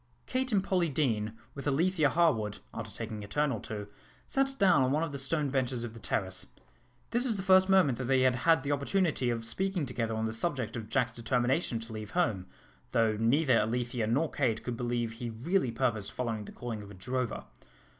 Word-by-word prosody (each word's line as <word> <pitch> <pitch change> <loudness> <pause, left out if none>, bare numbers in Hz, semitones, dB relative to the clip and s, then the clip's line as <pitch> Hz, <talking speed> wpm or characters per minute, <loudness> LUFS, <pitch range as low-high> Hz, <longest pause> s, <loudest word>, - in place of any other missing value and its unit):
Kate 260 0 -1
and 200 -3 +3
Polly 180 -4 +1
Deane, 115 -7 0 0.2
with 140 +1 -6
Alethea 155 +2 +3
Harwood, 115 -12 +2 0.2
after 115 0 -5
taking 110 0 -6
a - - -8
turn 145 +6 +1
or 115 - -2
two, 105 -1 -5 0.4
sat 270 0 0
down 190 -9 +5
on 130 0 +2
one 150 +3 +2
of 165 - -3
the 140 - -4
stone 145 +1 0
benches 130 -3 0
on 115 - -7
the 115 - -10
terrace. 90 - -2 0.6
This 240 +1 +1
was 235 -5 0
the 190 - -3
first 190 0 +5
moment 175 -11 +4
that 130 - -2
they 130 +1 +3
had 130 -1 +3
had 160 +1 +3
the 145 - -1
opportunity 145 -2 +1
of 115 -1 -2
speaking 185 +6 0
together 115 -3 -2
on 110 0 -1
the 110 - -2
subject 130 -1 -2
of 110 -3 -6
Jack's 120 -2 +1
determination 120 +3 0
to 115 0 -9
leave 110 -1 -6
home, 105 - +1 0.5
though 115 -2 +3
neither 125 +4 +3
Alethea 120 +1 -1
nor 145 +8 +1
Kate 120 -6 0
could 125 - -3
believe 120 -1 -1
he 115 +1 -5
really 130 - 0
purposed 115 -4 -1
following 115 -4 -3
the - - -9
calling 115 -3 -5
of 100 - -10
a 100 - -11
drover. 125 +4 -3
125 Hz, 210 wpm, -30 LUFS, 115-155 Hz, 0.6 s, down